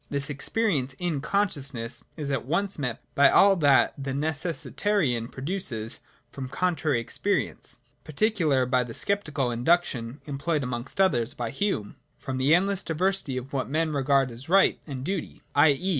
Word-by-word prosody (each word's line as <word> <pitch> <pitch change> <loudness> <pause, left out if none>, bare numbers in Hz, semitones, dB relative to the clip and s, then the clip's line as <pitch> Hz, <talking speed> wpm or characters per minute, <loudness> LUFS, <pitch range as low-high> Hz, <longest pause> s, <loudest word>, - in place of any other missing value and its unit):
This 140 +1 0
experience 140 - -1
in 170 -6 -2
consciousness 140 - -2
is 145 -3 -3
at 135 -4 -1
once 180 +7 -1
met 125 -5 -3
by 140 - +6
all 200 0 +6
that 145 -5 +4
the 135 -1 -3
Necessitarian 150 - 0
produces 130 - -3 0.3
from 130 -2 -6
contrary 155 -3 0
experience, 115 - -2 0.3
particularly 155 - +1
by 125 0 +2
the 115 -1 -8
sceptical 155 -11 -1
induction 125 -1 +1
(employed 145 +1 -1
amongst 125 +6 -5
others 140 -9 +2
by 120 -2 -3
Hume) 135 - -2 0.2
from 130 -1 -5
the 135 +5 +5
endless 195 +1 +1
diversity 170 -4 0
of 130 +2 -7
what 130 -2 -1
men 155 +2 0
regard 135 -2 +2
as 120 +6 -9
right 195 +2 +4
and 135 -3 -5
duty, 190 +6 -4
— - - -37
i.e. 145 +5 +4
140 Hz, 155 wpm, -26 LUFS, 130-175 Hz, 0.3 s, by